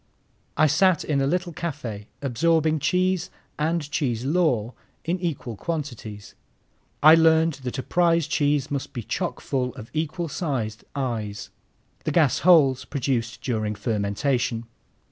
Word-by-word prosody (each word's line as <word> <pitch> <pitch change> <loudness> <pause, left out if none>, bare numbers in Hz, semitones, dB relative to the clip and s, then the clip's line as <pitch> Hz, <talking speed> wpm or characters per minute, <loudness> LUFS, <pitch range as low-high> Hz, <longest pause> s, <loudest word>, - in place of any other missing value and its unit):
I 155 - +5
sat 170 +3 +3
in 140 -3 0
a 135 - +1
little 175 +2 -1
café, 125 -11 -5 0.2
absorbing 155 +4 +2
cheese 185 +3 +1 0.3
and 160 0 0
cheese 125 -5 -1
lore 135 -8 +1 0.3
in 175 +3 -1
equal 150 -9 -3
quantities. 115 - -5 0.7
I 155 +1 +10
learned 160 -2 +4
that 125 - -3
a 130 - -3
prize 170 -2 +2
cheese 145 -3 0
must 140 -2 -3
be 120 - -5
chock - - -3
full 125 -3 -2
of 110 - -10
equal 160 +2 -2
sized 130 - -3
eyes, 110 -7 -3 0.5
the - - -1
gas 155 -7 +3
holes 145 -7 +5
produced 125 -5 -2
during 110 -4 -1
fermentation. 115 +3 -1
140 Hz, 135 wpm, -24 LUFS, 120-165 Hz, 0.7 s, I